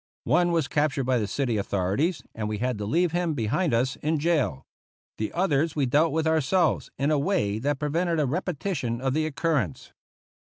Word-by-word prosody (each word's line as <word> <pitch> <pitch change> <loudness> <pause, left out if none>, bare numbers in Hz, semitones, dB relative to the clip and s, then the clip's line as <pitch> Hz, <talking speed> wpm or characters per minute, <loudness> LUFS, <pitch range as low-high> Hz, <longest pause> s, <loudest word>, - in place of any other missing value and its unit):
One 175 +7 +3
was 165 -5 +1
captured 145 -3 0
by 125 -1 +1
the 105 - -1
city 120 +1 -1
authorities, 100 - 0
and 105 -1 -3
we 105 - -2
had 125 0 -2
to 105 - -3
leave 170 +8 +2
him 175 -2 0
behind 145 - 0
us 125 +3 +1
in 155 +1 0
jail. 145 - 0 0.5
The 110 - -2
others 160 -3 +1
we 145 -3 +1
dealt 150 +6 +3
with 160 +2 0
our 160 0 +3
selves, 175 +7 +1
in 140 +2 +1
a 150 - +3
way 140 - 0
that 145 +4 0
prevented 165 +3 0
a 150 - +2
repetition 150 -5 -2
of 135 0 -1
the 155 +1 +1
occurrence. 145 - -1
145 Hz, 195 wpm, -26 LUFS, 120-165 Hz, 0.5 s, One